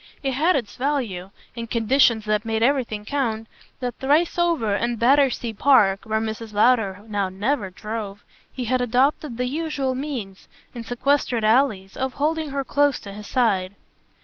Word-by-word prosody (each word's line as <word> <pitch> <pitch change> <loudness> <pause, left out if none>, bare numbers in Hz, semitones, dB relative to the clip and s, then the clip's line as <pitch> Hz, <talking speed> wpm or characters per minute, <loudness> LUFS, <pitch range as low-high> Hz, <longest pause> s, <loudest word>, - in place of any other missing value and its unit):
It 270 - 0
had 310 +7 +2
its 240 -7 -3
value, 245 -10 -2 0.3
in 230 -1 -5
conditions 230 -1 +3
that 210 0 0
made 225 -1 -1
everything 235 -6 0
count, 225 -5 -2 0.4
that 245 -2 -4
thrice 305 +6 +2
over, 330 -12 +1
in 235 +4 0
Battersea 250 -1 +2
Park 200 -5 +3
where 220 0 0
Mrs. 220 0 -5
Lowder 210 -3 +2
now 200 -3 -1
never 205 +3 -1
drove 205 +1 -6 0.3
he 255 - -5
had 255 +2 +1
adopted 255 +2 +1
the 250 - -1
usual 280 -1 -2
means, 255 -8 -6 0.3
in 235 -2 -7
sequestered 245 -1 0
alleys, 215 -4 +2
of 265 0 -2
holding 310 +1 -1
her 275 0 -2
close 285 0 +1
to 200 - -9
his 210 +1 -9
side. 200 -7 +1
240 Hz, 160 wpm, -23 LUFS, 215-275 Hz, 0.4 s, conditions